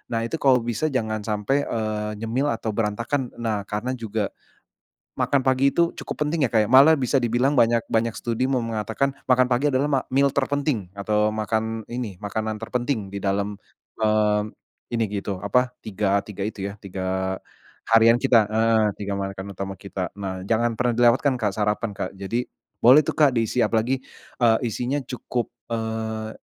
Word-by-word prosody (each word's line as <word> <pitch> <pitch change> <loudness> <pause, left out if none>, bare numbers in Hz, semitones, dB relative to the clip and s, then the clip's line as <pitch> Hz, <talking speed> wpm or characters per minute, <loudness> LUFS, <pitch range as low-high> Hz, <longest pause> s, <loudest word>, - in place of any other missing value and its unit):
Nah 115 - 0
itu 160 +7 -4
kalau 130 -3 +4
bisa 120 +6 -1
jangan 110 -6 -1
sampai, 110 +7 0
eee, 105 -1 -2
nyemil 125 +6 0
atau 115 -1 -2
berantakan. 115 +5 -2
Nah 110 -3 -2
karena 105 +5 -2
juga 110 -3 -3 0.9
makan 140 -2 +2
pagi 130 +1 +2
itu 170 0 +3
cukup - - -4
penting 150 -2 +1
ya, - - -8
Kak. 110 -1 +3
Malah 140 +5 +8
bisa 135 +1 +2
dibilang 125 +4 +1
banyak 115 0 +4
banyak 115 0 +1
studi 120 +2 -1
mau 130 -2 0
mengatakan 115 +4 -1 0.2
makan 130 0 +4
pagi 125 +4 +2
adalah 135 +3 +1
ma 135 -2 +2
meal 140 +1 +4
terpenting 135 - -1
atau 105 +1 +1
makan 110 +1 -1
ini 120 -4 -4
makanan 110 +1 -2
terpenting 120 -4 -2
di 100 - -3
dalam, 100 +1 -1 0.4
eee, 105 -1 +1 0.4
ini 115 -1 +2
gitu 100 -1 -5
apa 125 +4 +1
tiga 100 -1 0
tiga 100 -2 -7
itu 100 -2 -4
ya, 100 - -9
3 95 -1 -3 0.6
harian 115 +1 +6
kita, 115 -4 +5
heeh, 110 0 +3 0.2
tiga 100 0 -2
makan 95 0 -4
utama 95 +1 -5
kita. 95 -2 -5
Nah 95 -1 -5
jangan 115 +1 +1
pernah 125 -1 +1
dilewatkan, 120 +4 +4
Kak, 105 -3 +1
sarapan, 105 +1 0
Kak. 95 - -4
Jadi 100 +6 -3 0.4
boleh 130 +6 +8
tuh, - - -1
Kak, 145 -4 +5
diisi 115 +2 +1
apalagi, 120 +4 0 0.4
eee, 115 -2 +5
isinya 125 +6 -2
cukup, 125 -1 -4 0.2
eee, 110 -1 -3
115 Hz, 170 wpm, -24 LUFS, 105-125 Hz, 0.9 s, Malah